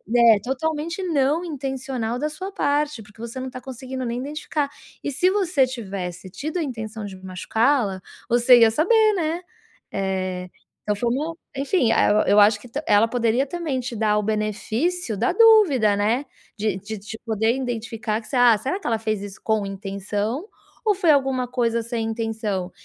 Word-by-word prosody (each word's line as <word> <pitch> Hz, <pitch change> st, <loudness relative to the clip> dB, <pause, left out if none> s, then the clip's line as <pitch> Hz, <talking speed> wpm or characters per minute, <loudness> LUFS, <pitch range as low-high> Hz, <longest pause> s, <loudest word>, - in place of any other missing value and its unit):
é 230 Hz, -3 st, +7 dB
totalmente 315 Hz, -, -2 dB
não 305 Hz, -1 st, +1 dB
intencional 265 Hz, -6 st, -3 dB
da 300 Hz, +4 st, -1 dB
sua 380 Hz, +6 st, -7 dB
parte 290 Hz, -4 st, 0 dB
porque 205 Hz, +2 st, -20 dB
você 235 Hz, +2 st, -7 dB
não 260 Hz, -, -4 dB
está 255 Hz, 0 st, -7 dB
conseguindo 260 Hz, 0 st, -6 dB
nem 235 Hz, 0 st, -2 dB
identificar. 290 Hz, +1 st, -3 dB, 0.3 s
E 290 Hz, -, -2 dB
se 360 Hz, +7 st, +2 dB
você 370 Hz, -9 st, +2 dB
tivesse 195 Hz, -7 st, -6 dB
tido 305 Hz, -, -5 dB
a 340 Hz, -, 0 dB
intenção 225 Hz, -5 st, -5 dB
de 195 Hz, -2 st, -8 dB
machucá-la, 200 Hz, +3 st, 0 dB, 0.3 s
você 240 Hz, +1 st, +6 dB
ia 225 Hz, -1 st, +7 dB
saber, 430 Hz, -, +4 dB
né. 335 Hz, -1 st, -1 dB, 0.5 s
É, 185 Hz, -2 st, -2 dB, 0.3 s
então 210 Hz, -, 0 dB
foi 235 Hz, +3 st, -1 dB
uma 310 Hz, +5 st, -2 dB, 0.2 s
enfim, 275 Hz, -3 st, +1 dB
eh, 215 Hz, -1 st, +4 dB
eu 205 Hz, +1 st, +5 dB
acho 205 Hz, 0 st, +5 dB
que 245 Hz, -, -13 dB
tam 275 Hz, +6 st, -4 dB
ela 205 Hz, +2 st, +5 dB
poderia 240 Hz, +2 st, +1 dB
também 310 Hz, -3 st, -3 dB
te 250 Hz, -1 st, -5 dB
dar 210 Hz, -1 st, +2 dB
o 210 Hz, -, 0 dB
benefício 220 Hz, -, -1 dB
da 235 Hz, -, +1 dB
dúvida, 370 Hz, -, +6 dB
né. 225 Hz, +7 st, +1 dB, 0.3 s
De 210 Hz, -3 st, -1 dB
de 210 Hz, +3 st, -6 dB
de 210 Hz, +2 st, -9 dB
poder 225 Hz, +1 st, +1 dB
identificar 225 Hz, -4 st, -3 dB
que 220 Hz, -, -15 dB
você -, -, -4 dB
“Ah, 245 Hz, -3 st, +6 dB
será 275 Hz, -, -3 dB
que -, -, -6 dB
ela 230 Hz, -2 st, +1 dB
fez 215 Hz, -2 st, -2 dB
isso 200 Hz, -1 st, -8 dB
com 220 Hz, -2 st, +1 dB
intenção 205 Hz, -, -3 dB, 0.4 s
ou 420 Hz, -2 st, +3 dB
foi 350 Hz, -4 st, +4 dB
alguma 265 Hz, -3 st, +2 dB
coisa 235 Hz, -2 st, 0 dB
sem 230 Hz, -1 st, -3 dB
intenção?”. 220 Hz, -5 st, -3 dB
240 Hz, 180 wpm, -23 LUFS, 215-285 Hz, 0.5 s, é